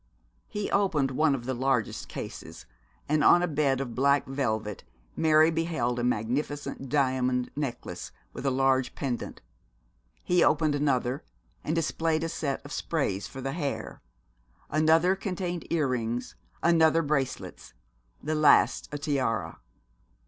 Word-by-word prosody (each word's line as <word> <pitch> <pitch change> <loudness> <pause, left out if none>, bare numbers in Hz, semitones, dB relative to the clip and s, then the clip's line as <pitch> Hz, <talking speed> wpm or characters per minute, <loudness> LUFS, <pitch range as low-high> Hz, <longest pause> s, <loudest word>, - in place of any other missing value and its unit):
He 210 -1 -4
opened 160 -9 +2
one 150 +1 +2
of 120 -3 -7
the 130 - -1
largest 125 -3 -1
cases, - - -8 0.4
and 150 0 +2
on 175 - +6
a - - +2
bed 145 -4 +1
of 130 -4 -4
black 140 +3 +3
velvet 110 -7 -2 0.3
Mary 155 0 +5
beheld 160 -7 -1
a - - -1
magnificent 130 +4 -2
diamond 130 -3 +1
necklace, 140 -4 -5 0.2
with - - -7
a 140 - +2
large 130 -1 +1
pendant. 125 -4 -4 0.8
He 180 -1 +3
opened 155 -1 +3
another 135 -2 0 0.4
and 155 - -1
displayed 160 0 0
a 165 - -1
set 140 -4 -3
of 145 - -9
sprays 120 - -2
for 135 - -8
the 135 +1 -3
hair. 145 -5 -4 0.7
Another 160 +4 +4
contained 180 -3 -4
earrings, 125 -7 -1 0.3
another 165 -1 +4
bracelets, 135 - -3 0.5
the 155 - -1
last 155 -1 +4
a 145 - -3
tiara. 125 - -1
140 Hz, 135 wpm, -28 LUFS, 130-160 Hz, 0.8 s, on